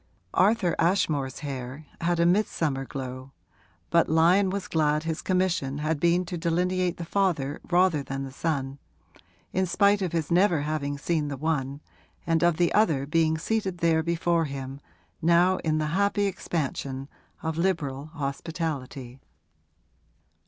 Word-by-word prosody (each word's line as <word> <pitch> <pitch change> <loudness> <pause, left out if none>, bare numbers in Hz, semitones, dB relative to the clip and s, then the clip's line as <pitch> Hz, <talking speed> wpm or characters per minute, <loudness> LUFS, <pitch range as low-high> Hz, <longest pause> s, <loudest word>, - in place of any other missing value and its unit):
Arthur 195 -3 +3
Ashmore's 155 -6 +1
hair 135 0 -6 0.2
had 170 0 +1
a 170 - +4
midsummer 165 -7 +1
glow, 130 0 -7 0.6
but 170 0 +4
Lyon 175 +5 +4
was 195 0 -3
glad 150 -1 +1
his 160 0 -3
commission 180 -7 0
had 155 0 -1
been 170 +3 +2
to 175 0 -5
delineate 180 +1 0
the 170 - -5
father 165 -7 0
rather 175 -3 +3
than 135 0 -4
the 135 - -6
son, 140 -2 -2 0.7
in 190 0 +1
spite 200 +3 +3
of 185 -3 -1
his 165 -2 -2
never 175 -3 +4
having 145 -1 -2
seen 155 +1 -1
the 140 -1 -4
one 140 -2 -2 0.4
and 165 -1 +2
of 175 -2 +3
the 175 -1 +2
other 160 -11 +3
being 160 +1 +2
seated 190 +1 -1
there 165 -1 +2
before 170 0 +1
him 135 -1 -6 0.4
now 175 +3 +4
in 155 -1 0
the 155 0 -1
happy 200 +1 +2
expansion 140 -7 -3 0.4
of 160 0 -2
liberal 150 -6 -1
hospitality. 140 -4 -5
160 Hz, 145 wpm, -26 LUFS, 140-175 Hz, 0.7 s, a